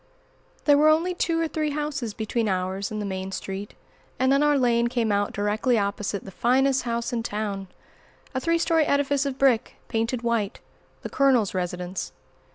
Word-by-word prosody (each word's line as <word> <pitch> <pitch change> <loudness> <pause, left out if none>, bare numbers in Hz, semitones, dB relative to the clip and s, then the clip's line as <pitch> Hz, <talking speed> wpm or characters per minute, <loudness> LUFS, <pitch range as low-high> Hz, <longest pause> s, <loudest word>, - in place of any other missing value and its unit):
THERE 290 -1 +6
were 305 +1 +6
only 330 +4 +3
two 335 -2 0
or 330 - +1
three 310 -1 -1
houses 290 -7 -3
between 220 0 -1
ours 190 +1 -2
and 215 - -4
the 210 - -3
main 190 -1 -4
street, 195 +1 -6 0.4
and 260 +1 +2
then 275 +1 +4
our 295 -1 +4
lane 235 -2 +3
came 235 -3 0
out 205 0 +1
directly 210 +4 +1
opposite 200 0 -2
the 195 - -8
finest 265 +6 +2
house 235 +1 -2
in 235 - 0
town, 205 -3 -3 0.7
a 260 - 0
three 335 +4 +1
story 330 -2 +2
edifice 280 0 +1
of 265 -1 -4
brick, 260 -5 +2
painted 230 +1 -1
white, 230 -4 -1 0.4
the - - -4
"Colonel's" 260 -7 +3
residence. 180 0 -3
235 Hz, 175 wpm, -25 LUFS, 205-280 Hz, 0.7 s, THERE